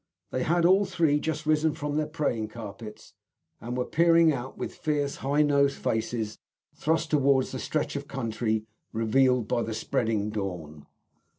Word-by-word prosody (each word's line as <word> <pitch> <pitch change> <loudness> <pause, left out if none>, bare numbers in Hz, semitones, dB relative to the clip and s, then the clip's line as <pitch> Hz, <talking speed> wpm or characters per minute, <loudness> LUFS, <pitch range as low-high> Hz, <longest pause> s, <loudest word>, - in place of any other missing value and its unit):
They 130 - -1
had 170 +4 +2
all 190 +3 +5
three 165 -6 +2
just 155 0 -3
risen 155 0 +2
from 145 -2 -3
their 155 0 0
praying 145 -9 -1
carpets, 105 -1 -9 0.5
and 120 +2 -5
were 125 - 0
peering 165 0 +4
out, 130 0 -6
with - - -4
fierce, 145 -2 -1
high 145 +3 +2
nosed 140 -1 +2
faces 110 -1 -2 0.3
thrust 160 +1 0
forwards, 140 -3 +3
at - - -11
the 130 - -4
stretch 155 +2 -2
of 140 0 -4
country 110 -4 -2 0.3
revealed 120 +1 +2
by 120 - 0
the 110 -1 -3
spreading 110 -2 -1
dawn. 85 -8 -5
135 Hz, 165 wpm, -27 LUFS, 110-155 Hz, 0.5 s, all